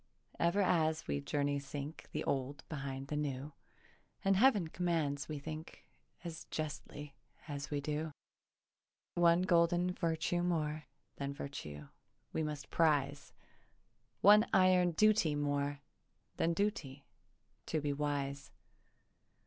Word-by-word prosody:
Ever 170 +4 +3
as 160 -3 +2
we 70 0 -1
journey 145 - 0
sink 140 +2 -7
The - - -2
old 135 +1 -2
behind 135 -2 -5
the 150 - -2
new, 145 0 -3 0.7
And 195 0 +5
Heav'n 205 -6 +4
commands 155 -5 -1
we 155 - -3
think 155 +3 -8 0.4
As 170 -1 -6
justly 150 -2 -5 0.3
as 140 -2 -5
we 145 -1 -1
do. 150 +2 -2 1.0
One 175 0 +4
golden 175 0 +3
virtue 170 0 0
more 155 -3 -1 0.3
Than 140 0 -3
virtue 75 - -7 0.5
we - - 0
must 150 -2 -4
prize, 145 -3 +2 0.9
One 210 +2 +8
iron 185 -2 +5
duty 210 -5 +4
more 145 -1 -1 0.6
Than 170 - +2
duty, 165 -9 -2 0.6
to 160 - 0
be 145 -1 -1
wise. 140 -1 -2
150 Hz, 115 wpm, -35 LUFS, 140-170 Hz, 1.0 s, One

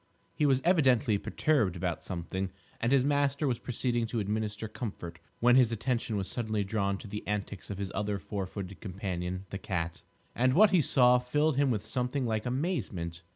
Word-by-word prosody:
He 150 - +2
was 135 -1 +2
evidently 130 - +4
perturbed 125 - +1
about 85 -3 -3
something, 95 +2 -3 0.3
and 115 - 0
his 135 -2 +4
master 145 0 +1
was 120 -3 0
proceeding 120 -1 -1
to 115 0 -2
administer 105 +1 -2
comfort 105 -6 -6 0.2
when 120 +1 +5
his 125 -3 +5
attention 115 -1 -1
was 95 -1 -2
suddenly 110 -1 -1
drawn 100 -1 -1
to 105 - -10
the 105 +1 -5
antics 105 -2 -4
of 100 - -4
his 100 -1 -4
other 105 -1 -1
four 100 0 -4
footed 95 0 -7
companion, 90 -1 -4
the 95 - -4
cat. 85 -5 -3 0.3
And 130 +2 +2
what 210 +2 +7
he 180 -4 +5
saw 125 -3 +5
filled 150 +4 +1
him 140 -1 +3
with 105 -4 -1
something 125 +4 -1
like 110 0 -1
amazement. 115 - -2
110 Hz, 185 wpm, -30 LUFS, 100-130 Hz, 0.3 s, what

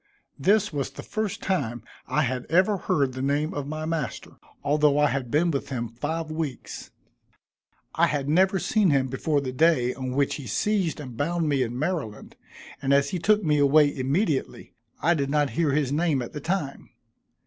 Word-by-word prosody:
This 205 +5 +2
was 140 -2 -2
the - - -10
first 215 0 -3
time 120 - -1 0.2
I 150 - +1
had 125 -1 -3
ever 185 +5 +3
heard 140 -7 0
the 130 - -5
name 145 +3 0
of 145 -1 -4
my 155 +1 -4
master, 160 -6 -4 0.3
although 145 0 +3
I 150 0 +4
had 135 -3 -2
been 165 +6 +2
with 140 - -3
him 120 -3 -3
five 155 +7 -4
weeks. 155 -5 -5 1.0
I - - +3
had 145 -2 -2
never 190 +5 +3
seen 200 +1 +2
him 135 -3 +2
before 145 +3 0
the 130 -2 -4
day 130 -3 +3
on 130 -1 -5
which 140 +2 +1
he 140 -4 -8
seized 190 - 0
and 130 -5 -8
bound 165 +4 -1
me 140 -3 +1
in 120 -1 -2
Maryland, 145 - -3 0.5
and 140 0 +3
as 140 0 +2
he 180 - -2
took 210 +4 +3
me 150 -3 +2
away 145 +1 +4
immediately, 140 +4 -1 0.3
I 170 - +4
did 140 -4 -1
not 145 -2 +1
hear 150 +5 +1
his 145 -3 +1
name 150 -3 +1
at 120 - -9
the 150 - -6
time. 165 -4 -3
145 Hz, 190 wpm, -25 LUFS, 135-165 Hz, 1.0 s, I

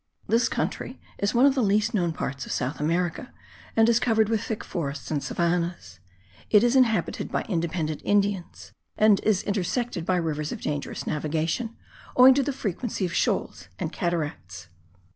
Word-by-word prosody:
This 230 +2 +2
country - - -3 0.2
is 200 +4 0
one 245 +3 +6
of 280 - +5
the 265 - 0
least 210 +2 +2
known 175 -5 +1
parts 140 -3 -4
of - - -6
South 130 +3 -2
America 170 - -1 0.4
and 225 0 +5
is 235 0 +4
covered 220 -3 +2
with 220 -2 +1
thick 220 - -4
forests 145 -4 -4
and 145 -2 0
savannahs; 170 - -2 0.5
it 210 0 +6
is 240 +2 +3
inhabited 240 -4 +2
by - - 0
independent 165 -4 -2
Indians 200 -3 -1 0.3
and 210 -2 +5
is 210 -4 +1
intersected 205 0 -2
by 185 +2 +1
rivers 155 -3 -2
of - - -5
dangerous 145 -1 -4
navigation, 160 +9 -2 0.4
owing 255 +1 +9
to 280 - +2
the 285 - -1
frequency 215 -4 -3
of 170 - -4
shoals - - -1
and - - -4
cataracts. 145 - -3
185 Hz, 165 wpm, -26 LUFS, 160-225 Hz, 0.5 s, owing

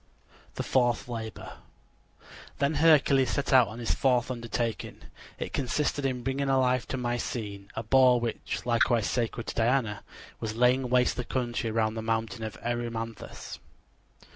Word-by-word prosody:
THE - - -3
FOURTH 120 -3 +1
LABOR 110 -3 -7 1.0
Then 140 +2 +1
Hercules 145 -4 +4
set 140 -1 -1
out 125 -4 +7
on 110 +3 -8
his 120 -1 0
fourth 125 -2 +1
undertaking. 115 -1 -3 0.4
It - - -5
consisted 140 +1 0
in 125 -2 -3
bringing 135 +1 -1
alive 130 -2 +2
to 135 - -3
Mycene 115 -5 -3
a 110 - -3
boar 125 +1 +5
which, 120 0 -4
likewise 120 -2 +2
sacred 115 -1 -2
to - - -4
Diana, 115 -2 +1 0.4
was 110 -1 -4
laying 125 +2 +3
waste 125 0 +2
the 125 - -1
country 120 -2 -2
around 110 0 +1
the 110 - -4
mountain 115 +1 -2
of 110 - -5
Erymanthus. 115 -2 -5
120 Hz, 145 wpm, -28 LUFS, 115-130 Hz, 1.0 s, out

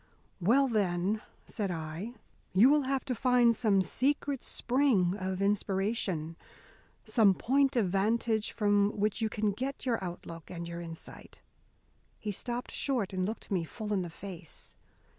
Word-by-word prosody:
"Well, 245 +10 +4
then," 200 -2 0 0.2
said 205 -3 -3
I, 165 +7 -5 0.4
"you 220 +9 +7
will 295 -2 +3
have 270 0 -1
to 260 - -1
find 245 -1 +4
some 205 -5 +3
secret 280 +3 0
spring 240 -9 +2
of 190 -1 -2
inspiration, 195 -5 0 0.7
some 210 -5 +4
point 270 +5 +2
of 225 -6 +3
vantage 220 +3 +1
from 205 -1 +2
which 210 +1 0
you 220 - +1
can 210 -1 0
get 265 +8 -4
your 230 -6 0
outlook 170 -2 -7
and 170 -1 -6
your 170 0 -6
insight." 165 -1 -10 0.7
He 210 - -4
stopped 240 +5 -4
short 240 -9 -1
and 185 0 0
looked 220 0 -6
me 180 -4 +1
full 210 +5 -5
in 195 - +1
the 175 - -4
face. 175 -2 -10
210 Hz, 150 wpm, -31 LUFS, 185-240 Hz, 0.7 s, you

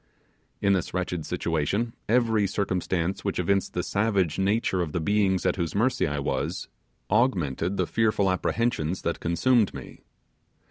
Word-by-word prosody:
In 100 - +3
this 95 -1 -1
wretched 90 -3 -2
situation, 90 +9 -1 0.2
every 110 -3 +3
circumstance 95 -1 -1
which 100 - -2
evinced 100 +2 0
the 90 - 0
savage 100 -6 0
nature 95 -1 +1
of 80 -4 -3
the - - 0
beings 95 +1 +1
at - - +1
whose 85 -2 -2
mercy 120 +6 +2
I 75 0 -2
was, 70 - -2 0.4
augmented 95 - +1
the 90 - +1
fearful 105 -2 +1
apprehensions 95 -3 -1
that 85 - -1
consumed 110 +6 +2
me. - - -9
95 Hz, 145 wpm, -26 LUFS, 85-105 Hz, 0.4 s, In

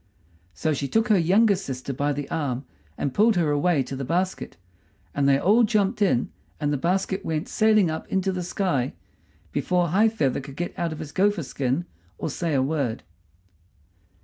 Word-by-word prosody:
So 155 -1 0
she 140 0 -2
took 225 - +1
her 210 - +5
youngest 195 +3 +3
sister 130 +1 -5
by 145 +3 0
the 145 -1 -3
arm 135 -4 -2 0.3
and 135 - -2
pulled 220 +1 +4
her 165 -4 +2
away 145 0 +2
to 135 - -6
the 135 - -4
basket, 180 - -2 0.6
and 140 -1 +2
they 135 - +5
all 205 +11 +4
jumped 210 -3 +1
in 175 -12 +2 0.3
and 145 -1 0
the - - +1
basket 190 +5 -1
went 160 +3 -2
sailing 215 -5 +3
up 160 - -5
into 190 0 0
the 185 -1 -3
sky 175 -8 -1 0.6
before 180 -2 +1
High 210 +7 +4
feather 140 - 0
could 135 0 -10
get 175 +3 -4
out 170 -1 -2
of 155 - -5
his 150 -2 -7
gopher 200 -1 +1
skin 135 +4 -2 0.3
or 155 - -3
say 165 0 -1
a 130 - +3
word. 135 -5 -1
165 Hz, 185 wpm, -25 LUFS, 140-190 Hz, 0.6 s, her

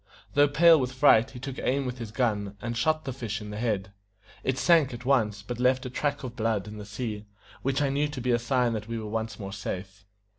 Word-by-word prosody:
Though 145 0 +5
pale 160 +3 +6
with 130 -1 -2
fright, 130 -3 +5
he 125 - -10
took 135 0 -6
aim 135 +2 0
with 125 -1 -4
his 115 -2 -5
gun, 105 -4 -1
and 120 +2 -4
shot 155 +6 +1
the 135 - -3
fish 115 -4 -4
in 105 -1 -8
the 105 - -5
head. 105 -5 -1 0.5
It 130 0 0
sank 160 -7 +4
at 120 +1 -10
once, 110 -7 +2
but 120 +3 -5
left 130 +1 +2
a 125 - -5
track 145 +2 -1
of 125 -2 -6
blood 110 -3 0
in 105 0 -8
the 105 - -7
sea, 105 0 -5 0.3
which 135 +2 0
I 140 - +2
knew 145 +2 +1
to 145 -2 -6
be 125 0 0
a 120 - +3
sign 120 0 +1
that 110 -1 -4
we 115 0 -3
were 110 - -5
once 110 0 -3
more 100 -1 -6
safe. 100 0 -6
120 Hz, 250 wpm, -27 LUFS, 105-135 Hz, 0.5 s, pale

